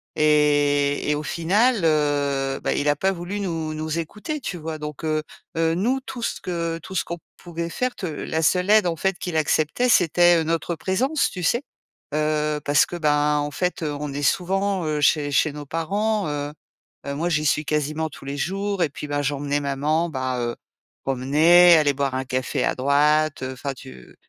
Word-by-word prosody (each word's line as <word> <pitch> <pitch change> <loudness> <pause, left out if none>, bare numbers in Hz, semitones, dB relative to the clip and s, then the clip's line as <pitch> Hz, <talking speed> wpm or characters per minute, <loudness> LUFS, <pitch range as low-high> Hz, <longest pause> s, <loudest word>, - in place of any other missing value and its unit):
et 145 -1 +2
et 150 - +2
au 150 - -4
final, 205 +9 +2
heu, 145 -3 +1
bah, - - +1
il 145 - -1
a 145 - +3
pas 190 +6 +1
voulu 190 +3 -5
nous 165 -5 -3
nous 155 +1 -3
écouter, 210 - -5
tu 180 - -4
vois? 160 -1 -5
Donc, 150 +1 -7
heu, 155 0 0 0.3
heu, 165 0 +2
nous, 240 +9 +1
tout 260 -2 -8
ce - - -2
que 170 -2 -3
tout - - -9
ce - - +1
qu'on 170 - -5 0.2
pouvait 170 -1 -5
faire, 255 +7 -2
te - - -5
la 160 0 -3
seule 180 +4 +2
aide 215 -3 +6
en 170 - 0
fait 190 +3 -1
qu'il 175 -3 -3
acceptait, 155 +9 +1
c'était, 175 -5 +5
heu, 165 - +1
notre 165 +1 -1
présence, 235 - 0
tu 180 - -7
sais? 235 +9 +2 0.5
Heu, 150 0 0
parce 145 0 +4
que, 175 - -6
ben, 150 -2 +2
en 145 0 -2
fait, 180 +4 -2
heu, 150 -2 -2
on 150 -1 -4
est 145 - -4
souvent, 190 +2 0
heu, 150 -1 -1
chez 145 0 +2
chez 155 +2 +2
nos 150 0 -7
parents, 200 +5 -1
heu, 145 0 -3 0.6
heu, 140 - -3
moi, 165 +5 -1
j'y 155 -2 +1
suis 150 +1 +2
quasiment 150 +1 -1
tous 135 - -13
les 140 +1 -4
jours 195 +5 -2
et 165 - +3
puis, 150 - -7
ben, 145 0 -1
j'emmenais 145 0 -1
maman, 150 +4 0
bah, 130 -3 -2
heu, 120 0 -2 0.5
promener, 155 +7 +5
aller 145 -2 +2
boire 135 -1 -1
un 130 0 -2
café 130 +1 -2
à - - +1
droite. 145 +2 +2
Heu, 130 0 -3
enfin, 140 +2 -4
tu 130 - -13
155 Hz, 205 wpm, -23 LUFS, 145-175 Hz, 0.6 s, aide